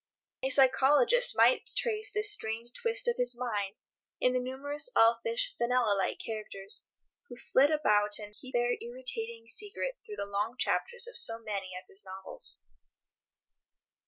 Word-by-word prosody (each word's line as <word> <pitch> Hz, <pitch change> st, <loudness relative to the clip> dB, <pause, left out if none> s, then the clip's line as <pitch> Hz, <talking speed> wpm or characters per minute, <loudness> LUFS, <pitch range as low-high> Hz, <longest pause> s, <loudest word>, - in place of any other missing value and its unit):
A 265 Hz, -, 0 dB
psychologist 275 Hz, -, +4 dB
might -, -, +4 dB
trace 435 Hz, -3 st, 0 dB
this 420 Hz, 0 st, +4 dB
strange 230 Hz, -, -4 dB
twist 480 Hz, +1 st, 0 dB
of 480 Hz, -, +1 dB
his 245 Hz, -1 st, +2 dB
mind 210 Hz, -5 st, -3 dB, 0.4 s
in 250 Hz, -, +2 dB
the 255 Hz, -, +1 dB
numerous 280 Hz, -, -2 dB
elfish 465 Hz, -, +3 dB
Fenella 240 Hz, -3 st, +1 dB
like 195 Hz, -, -1 dB
characters 210 Hz, -2 st, -4 dB, 0.4 s
who -, -, -9 dB
flit 275 Hz, +2 st, +3 dB
about 210 Hz, -9 st, +3 dB
and 210 Hz, -1 st, -8 dB
keep 260 Hz, +4 st, -6 dB
their 240 Hz, 0 st, +1 dB
irritating 470 Hz, -1 st, -5 dB
secret 430 Hz, +4 st, -3 dB
through 430 Hz, -2 st, -9 dB
the -, -, -4 dB
long 205 Hz, +4 st, -2 dB
chapters 480 Hz, +1 st, -1 dB
of 485 Hz, -, -10 dB
so 225 Hz, -, +3 dB
many 200 Hz, -5 st, -5 dB
of 185 Hz, -, -10 dB
his 195 Hz, -, -4 dB
novels. 190 Hz, -, -7 dB
255 Hz, 150 wpm, -30 LUFS, -, 0.4 s, psychologist